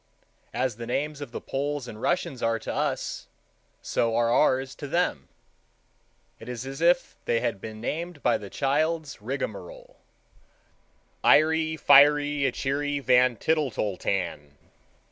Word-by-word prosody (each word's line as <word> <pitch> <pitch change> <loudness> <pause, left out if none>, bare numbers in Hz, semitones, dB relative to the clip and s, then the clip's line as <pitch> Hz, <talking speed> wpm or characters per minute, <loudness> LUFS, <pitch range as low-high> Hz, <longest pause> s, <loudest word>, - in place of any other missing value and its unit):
As 125 -4 -1
the 115 -1 -7
names 145 +4 -2
of 140 -4 -7
the - - -5
Poles 140 -1 -3
and 110 -2 -9
Russians 175 -8 -1
are 115 0 +1
to - - -5
us, - - -2 0.6
so 115 -1 0
are 115 0 +2
ours 130 0 +2
to 145 - -8
them. 155 - -1 1.1
It 115 - -10
is 125 0 -5
as 135 +3 -7
if 170 +1 +3
they 115 - +1
had 100 -5 -2
been 110 -1 -8
named 165 +6 -4
by - - +2
the 100 - -9
child's 155 +1 -1
rigmarole—Iery 160 - -2
wiery 145 0 +6
ichery 140 +3 -1
van, 125 -2 +4
tittle 155 +2 +1
tol 105 -4 -2
tan. 85 -8 -3
135 Hz, 135 wpm, -26 LUFS, 115-150 Hz, 1.1 s, wiery